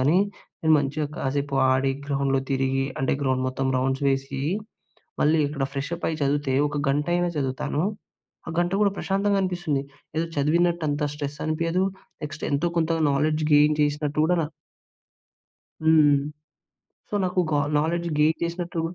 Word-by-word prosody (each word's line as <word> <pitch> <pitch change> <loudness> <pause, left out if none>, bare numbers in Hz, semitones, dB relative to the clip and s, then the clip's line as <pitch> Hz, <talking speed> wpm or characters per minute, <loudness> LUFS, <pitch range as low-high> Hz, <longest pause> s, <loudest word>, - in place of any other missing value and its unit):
గానీ, 150 +8 +4 0.4
నేను 160 -1 +4
మంచిగా 145 +2 -1
కాసేపు 140 +1 -1
ఆడి, 135 +1 +2
గ్రౌండ్‍లో 135 -1 +1
తిరిగి, 135 0 +1
అంటే 135 - +1
గ్రౌండ్ 130 -1 +1
మొత్తం 135 +1 -2
రౌండ్స్ 135 +2 0
వేసి, 135 0 -1 0.8
మళ్ళీ 155 +2 +4
ఇక్కడ 145 -2 -4
ఫ్రెష్ 145 +4 -4
అప్పయి 160 -2 -2
చదివితే, 140 -1 +1
ఒక 145 - -5
గంటయినా 175 +5 +1
చదువుతాను. 135 +2 -1 0.7
ఆ - - -3
గంట 175 +1 +1
గూడా 205 - +4
ప్రశాంతంగా 200 +1 +1
అనిపిస్తుంది. 175 -7 -1 0.3
ఏదో 165 - +1
చదివినట్టు 170 +3 +2
అంత 145 +1 -1
స్ట్రెస్ 145 0 -5
అనిపియదు, 165 +3 0 0.4
నెక్స్ట్ 155 - -6
ఎంతో 145 +4 +1
కొంత 165 -1 +1 0.2
నాలెడ్జ్ 155 +2 +1
గెయిన్ 150 +1 +6
చేసినట్టు 150 0 -1
గూడా 180 +2 +3
నా - - -1 1.4
హ్మ్. 155 -3 +6 0.9
సో, - - -13
నాకు 180 0 +1
గా 145 - +3 0.2
నాలెడ్జ్ 170 +2 -1
గెయిన్ 155 +1 +3
చేసినట్టు 170 0 -3
150 Hz, 145 wpm, -25 LUFS, 140-165 Hz, 1.4 s, గెయిన్